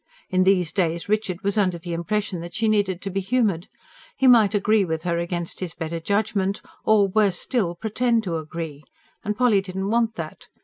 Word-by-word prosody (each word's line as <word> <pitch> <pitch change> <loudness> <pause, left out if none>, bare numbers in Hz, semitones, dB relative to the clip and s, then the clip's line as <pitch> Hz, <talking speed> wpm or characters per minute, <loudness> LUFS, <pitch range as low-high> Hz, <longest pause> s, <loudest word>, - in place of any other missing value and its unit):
In 185 0 +3
these 180 -4 +3
days 170 -2 -1
Richard 205 -4 -1
was 200 +2 +1
under 185 -4 +1
the 170 +1 -6
impression 195 +2 -2
that 170 +1 -8
she 220 0 +1
needed 200 -4 +1
to 195 - -4
be 195 - -1
humoured. 200 -4 0 0.5
He 265 - +1
might 225 -5 +6
agree 210 +1 +3
with 160 -3 -3
her 170 -1 0
against 170 0 -4
his 175 -3 -5
better 165 0 -4
judgment, 200 +2 0 0.2
or, 210 -2 +4
worse 205 -1 +2
still, 195 -9 -1
pretend 225 +4 0
to 170 -5 -2
agree. 155 -2 -6 0.4
And 210 +1 -2
Polly 235 -6 +4
didn't 190 +1 -4
want 230 -1 +1
that. 160 -2 -7
195 Hz, 190 wpm, -23 LUFS, 170-215 Hz, 0.5 s, might